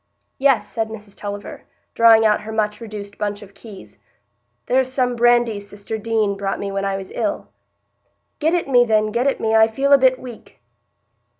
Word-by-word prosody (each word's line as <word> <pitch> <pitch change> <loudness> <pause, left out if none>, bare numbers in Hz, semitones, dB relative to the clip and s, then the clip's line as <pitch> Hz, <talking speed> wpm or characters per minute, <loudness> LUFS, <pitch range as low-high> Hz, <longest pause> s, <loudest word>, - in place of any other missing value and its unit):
"Yes," 270 -3 +2
said 225 -1 -3
Mrs 210 -2 -10
Tulliver, 205 0 -7 0.3
drawing 225 -1 +6
out 210 -1 +3
her 215 +1 -8
much 215 0 -2
reduced 205 -2 -9
bunch 205 0 -3
of 200 -1 -16
keys, 200 -3 -13 0.7
"there's 260 0 +1
some 250 -2 0
brandy 240 -2 +3
sister 205 +1 -8
Deane 215 -2 0
brought 195 0 -3
me 200 -1 -4
when 195 0 -2
I 195 0 -1
was 190 -1 -9
ill." 310 -1 -3 0.9
"Get 320 +3 +1
it 345 - -1
me, 245 -3 +5
then; 215 -2 +1
get 240 +4 0
it 275 - 0
me. 220 0 -1
I 220 0 +6
feel 275 +5 +1
a 280 - +7
bit 260 0 +4
weak." 245 -3 -12
220 Hz, 185 wpm, -20 LUFS, 205-245 Hz, 0.9 s, a